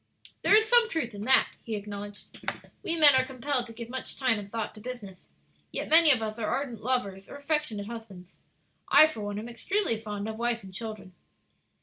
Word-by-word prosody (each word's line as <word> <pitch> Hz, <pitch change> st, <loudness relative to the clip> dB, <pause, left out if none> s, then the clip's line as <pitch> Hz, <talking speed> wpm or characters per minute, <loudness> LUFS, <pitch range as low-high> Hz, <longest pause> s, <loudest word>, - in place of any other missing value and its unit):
"There -, -, +5 dB
is 435 Hz, +1 st, +5 dB
some 475 Hz, 0 st, +5 dB
truth 275 Hz, -, -2 dB
in 205 Hz, +1 st, -6 dB
that," 265 Hz, +2 st, +6 dB, 0.2 s
he 225 Hz, -, -4 dB
acknowledged; 205 Hz, 0 st, -8 dB, 0.4 s
"we 335 Hz, -, -2 dB
men 300 Hz, -3 st, +7 dB
are 260 Hz, 0 st, +4 dB
compelled 260 Hz, -1 st, -2 dB
to -, -, -10 dB
give 230 Hz, 0 st, -8 dB
much 260 Hz, +2 st, -5 dB
time 250 Hz, -5 st, +2 dB
and 200 Hz, -1 st, -9 dB
thought 225 Hz, -2 st, -3 dB
to 215 Hz, -, -13 dB
business, 210 Hz, -6 st, -9 dB, 0.4 s
yet -, -, -4 dB
many 320 Hz, 0 st, +7 dB
of 250 Hz, -6 st, +4 dB
us 215 Hz, +1 st, -4 dB
are 215 Hz, -, -1 dB
ardent 260 Hz, -5 st, -3 dB
lovers 205 Hz, -6 st, -2 dB
or -, -, -9 dB
affectionate 285 Hz, -8 st, -1 dB
husbands. 205 Hz, -5 st, -10 dB, 0.5 s
I, 310 Hz, -, +9 dB
for 310 Hz, -9 st, -4 dB
one, 205 Hz, 0 st, -4 dB
am 215 Hz, +3 st, -5 dB
extremely 240 Hz, -, -1 dB
fond 210 Hz, -1 st, -5 dB
of 220 Hz, 0 st, -5 dB
wife 235 Hz, -1 st, -1 dB
and 190 Hz, -1 st, -11 dB
children." 215 Hz, -3 st, -7 dB
230 Hz, 205 wpm, -28 LUFS, 210-270 Hz, 0.5 s, I